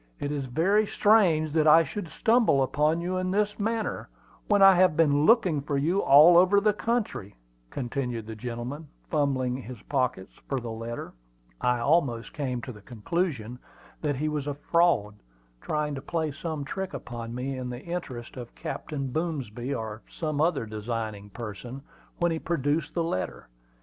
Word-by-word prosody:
"It 145 - -3
is 140 -3 -3
very 195 - +2
strange 180 -10 +3
that 155 0 +2
I 165 +2 +8
should 190 +2 -5
stumble 220 - +3
on 155 +3 +2
you 180 +2 -2
in 185 0 -1
this 210 +2 0
manner, 225 +1 -2 0.4
when 205 -2 +4
I 195 0 +9
have 180 -3 +4
been 150 -2 +3
looking 185 - +4
for 145 0 -2
you 165 +8 +1
all 155 +5 +8
over 185 +3 +5
the 210 +1 +2
country," 215 - -2 0.3
continued 125 - -3
the 110 0 -7
gentleman, 125 +7 -6 0.2
fumbling 130 -4 +1
his 125 -2 -9
pockets 125 -9 -1 0.2
for 135 - 0
the 120 -2 -6
letter. 115 +1 -6 0.5
I 125 0 +2
almost 125 -2 +1
came 125 -4 -3
to 135 - -6
the 105 -3 -13
conclusion 125 - -3 0.4
that 145 -2 0
he 150 +4 -1
was 150 -2 -2
a 145 - -2
"fraud," 145 -10 +1 0.4
trying 150 -1 -2
to 135 - -5
play 160 +1 -2
some 155 0 -5
trick 190 +6 -4
upon 120 -1 -6
me, 130 +2 -3
in 130 -1 -5
the 125 +1 -7
interest 140 -9 -6
of 120 -2 -9
Captain 140 -4 -5
Boomsby, 135 -6 -3
or 110 -1 -5
some 155 -3 -2
other 165 -7 +1
designing 110 -1 -5
person, 120 +4 -7 0.4
when 175 -1 +1
he 160 - -1
produced 150 -1 -1
the 170 - +1
letter. 95 - -4
145 Hz, 170 wpm, -27 LUFS, 120-170 Hz, 0.5 s, I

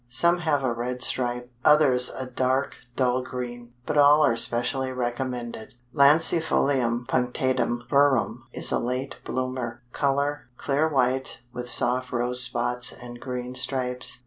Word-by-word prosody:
Some 170 +9 +2
have 150 -5 0
a 125 -2 0
red 125 +1 -3
stripe, 125 0 -2
others 135 -5 +4
a 130 - -6
dark 130 +2 -1 0.2
dull 130 -1 +1
green, 120 -1 -7
but 150 - 0
all 145 +1 +6
are 115 - +2
specially 120 +3 +1
recommended. 120 -2 -4 0.2
Lancifolium 140 -5 +3
Punctatum 125 -1 -1
verum 130 -4 +1
is - - +1
a - - +1
late 125 +3 -4
bloomer; 130 -2 -4
color, 140 0 -1
clear 145 +3 0
white 130 -3 -1
with 125 0 -5
soft 125 +2 0
rose 125 +1 +3
spots 120 0 +1
and 120 -1 -11
green 125 0 -5
stripes. 130 -1 -2
125 Hz, 135 wpm, -25 LUFS, 120-135 Hz, 0.2 s, all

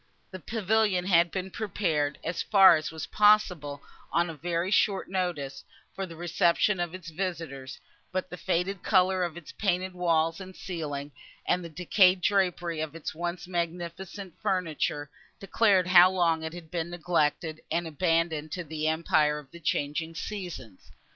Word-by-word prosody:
The 185 - -7
pavilion 210 -1 +1
had 175 -2 +4
been 190 +1 -4
prepared, 165 -9 -1
as 165 +1 -2
far 195 -4 +7
as 155 -1 -2
was 160 -1 -6
possible, 180 -9 +3 0.3
on 170 0 +1
a - - -8
very 170 +4 -2
short 200 -3 +2
notice, 175 -8 -2 0.3
for 195 -1 -4
the 165 - -10
reception 175 +3 +2
of 175 0 -2
its 170 -3 -9
visitors; 160 -7 -5 0.3
but 185 0 -2
the - - -5
faded 180 +1 -1
colours 185 -2 +3
of 170 0 -11
its 175 - -10
painted 185 -2 -1
walls 165 -1 +1
and 185 0 -10
ceiling, 150 -5 -5 0.3
and 180 0 +1
the 170 - -7
decayed 180 +3 +3
drapery 175 -4 +1
of 155 0 -5
its 165 - -5
once 175 +2 -4
magnificent 175 +2 -4
furniture, 155 -5 -1 0.3
declared 195 -2 +3
how 180 0 +8
long 170 -3 +1
it 160 0 -5
had 170 -2 -10
been 170 -1 -2
neglected, 165 -2 -1
and 170 +1 -1
abandoned 160 -1 0
to 180 - -3
the 155 0 -3
empire 155 -2 +2
of 145 -2 -11
the 170 - -11
changing 155 +1 -2
seasons. 170 - -7
175 Hz, 160 wpm, -28 LUFS, 160-185 Hz, 0.3 s, how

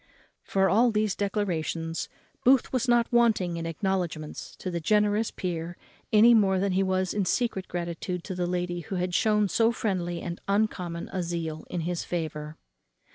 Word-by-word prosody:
For 195 0 +1
all 225 +7 +4
these 215 -2 +1
declarations 170 -5 -2 0.3
Booth 260 +1 +4
was 255 0 0
not 240 0 +3
wanting 215 -8 +3
in 165 0 -3
acknowledgments 165 -3 -3
to 185 - -5
the 170 - -2
generous 210 +5 +2
peer 175 -1 -4 0.3
any 220 +3 +7
more 195 -4 +4
than 195 +1 +1
he 185 +1 +2
was 185 -1 0
in 205 -2 0
secret 210 -2 0
gratitude 175 0 -4
to 190 - -5
the 180 -1 -1
lady 175 0 -2
who 175 +3 -6
had 180 0 -1
shewn 210 +1 +3
so 225 +4 +3
friendly 180 -6 -2
and 175 0 -6
uncommon 185 -5 -1
a 185 - -1
zeal 165 -2 -4
in 175 - -2
his 175 +1 -2
favour. 155 -2 -4
185 Hz, 170 wpm, -27 LUFS, 170-210 Hz, 0.3 s, any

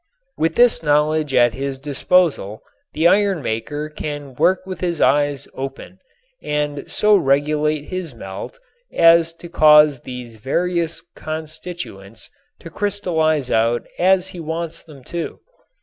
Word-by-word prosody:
With 165 - 0
this 240 -6 +4
knowledge 150 -1 +1
at 120 -2 +4
his 135 +2 -4
disposal 140 - 0 0.3
the 160 +2 +3
iron 195 -3 +2
maker 120 +7 -3
can 145 -2 -6
work 185 +8 +1
with 185 -2 -7
his 175 -3 -2
eyes 145 -1 +2
open 135 +7 -7 0.4
and 150 -1 -3
so 210 0 +4
regulate 150 -1 +1
his 175 -5 -6
melt 95 - -8 0.3
as 165 0 +5
to 170 - -11
cause 150 -4 +5
these 125 -2 -9
various 165 +6 -1
constituents 155 - -8 0.3
to 165 - -10
crystallize 160 -8 0
out 115 +2 +1
as 185 +1 +3
he 180 - -9
wants 165 +1 -4
them 145 -5 -15
to. 170 +5 -5
155 Hz, 130 wpm, -20 LUFS, 140-170 Hz, 0.4 s, as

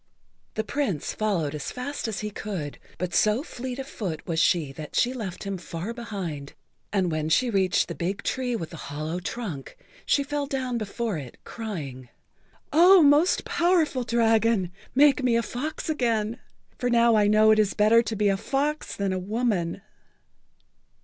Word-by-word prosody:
The 220 - 0
Prince 220 - -2
followed 180 -9 -1
as 150 -2 -4
fast 255 +1 -4
as 215 -3 -3
he 210 0 -4
could, 185 -9 -5 0.2
but 175 0 -3
so 215 +8 +3
fleet 255 -4 -6
of 270 - -5
foot 180 - -5
was 165 -2 -1
she 160 -5 +2
that 150 +2 -9
she 245 +2 +2
left 210 -8 -5
him 195 -2 -4
far 170 +6 -5
behind, 185 - -6 0.4
and 190 -4 +1
when 155 0 -1
she 245 +9 +3
reached 190 -3 +2
the 170 - -4
big 175 +6 -3
tree 250 -2 -1
with 165 -7 -5
the 165 - -8
hollow 155 +4 -4
trunk 180 - -6 0.3
she 280 - +2
fell 290 0 -2
down 260 -4 -2
before 215 -3 -3
it, 130 -4 -10
crying: 165 - -6
[Pg 125 - -18 0.7
41]"Oh, 365 0 +8
most 295 +5 +4
powerful 335 -7 +2
dragon, 225 -5 +2 0.2
make 280 -1 +5
me 250 -2 +2
a 230 - +2
fox 295 +8 -4
again, 235 -6 0 0.4
for 245 - 0
now 235 -1 +4
I 210 -1 +4
know 215 +1 +5
it 215 - +4
is 210 -2 +2
better 220 +2 +5
to 225 -1 -4
be 210 0 +2
a 195 - +1
fox 285 +7 -2
than 195 -1 -1
a 185 - -1
woman." 200 -3 -1
215 Hz, 175 wpm, -26 LUFS, 180-250 Hz, 0.7 s, 41]"Oh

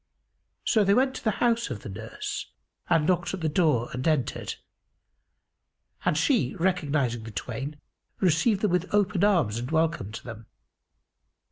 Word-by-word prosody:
So 215 - +4
they 200 0 +4
went 265 +2 +3
to - - -10
the 220 - +2
house 235 -4 +2
of 115 -6 -5
the - - -7
nurse 110 +3 -5 0.4
and 165 -3 +3
knocked 175 +1 +1
at 185 - -9
the 160 - +1
door 150 -7 +2
and 125 +3 -2
entered; 150 -6 0 1.5
and 150 - +2
she, 230 - +2
recognising 150 -10 0
the 110 - -8
twain, 130 +7 -5 0.4
received 190 +4 +3
them 210 - +2
with 180 +1 0
open 200 -2 +2
arms 160 - +3
and 120 +2 -5
welcomed 160 -10 0
them. 115 -2 -9
160 Hz, 150 wpm, -27 LUFS, 125-190 Hz, 1.5 s, So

